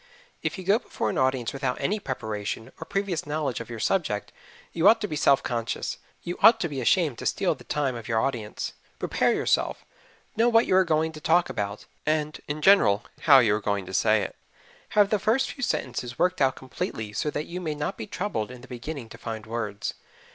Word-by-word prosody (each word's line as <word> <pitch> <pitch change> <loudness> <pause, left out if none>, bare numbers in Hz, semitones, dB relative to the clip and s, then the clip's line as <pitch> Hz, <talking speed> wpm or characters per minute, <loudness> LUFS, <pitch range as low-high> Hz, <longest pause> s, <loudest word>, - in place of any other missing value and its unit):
If - - -2
you 190 - -6
go 200 +5 +4
before 110 - -3
an - - -1
audience 130 -3 +1
without 135 -2 -2
any 200 +10 0
preparation, 110 - -4
or - - -4
previous 195 -4 -2
knowledge 150 -4 -1
of 115 - -8
your 115 - -5
subject, 130 - 0 0.4
you 165 - +3
ought 225 +1 +7
to 210 - -1
be 155 - -4
self 140 -2 +4
conscious 115 -2 -3 0.2
you 175 - -5
ought 225 0 +8
to 170 - +1
be 140 -4 -4
ashamed 150 0 +2
to - - -2
steal - - +1
the - - -15
time 140 -3 0
of 115 -2 -7
your 115 -2 +1
audience. 115 -4 -2 0.2
Prepare - - +1
yourself. - - 0 0.5
Know 230 +2 +4
what 230 0 +5
you - - +2
are 190 - +6
going 160 -1 +1
to 155 -1 -11
talk 170 +3 +3
about, 100 0 -4 0.2
and, 155 0 -1
in 150 +1 -4
general, 120 - +5 0.2
how 140 - +11
you 115 -5 +5
are 105 - 0
going 100 -2 -1
to - - -9
say - - +3
it. - - -6 0.6
Have 205 -1 +5
the 210 - +3
first 250 +7 +1
few 275 - -10
sentences 125 - -2
worked 180 -3 +1
out 135 -1 +3
completely 110 -4 -5
so 150 - -1
that 150 +1 -3
you 180 +2 -6
may 155 -3 -2
not 150 0 -3
be 110 - -7
troubled 170 - -3
in 125 -1 -10
the 130 - -13
beginning 125 +1 -6
to - - -12
find 110 -1 -5
words. 105 -2 -3
140 Hz, 220 wpm, -26 LUFS, 115-175 Hz, 0.6 s, how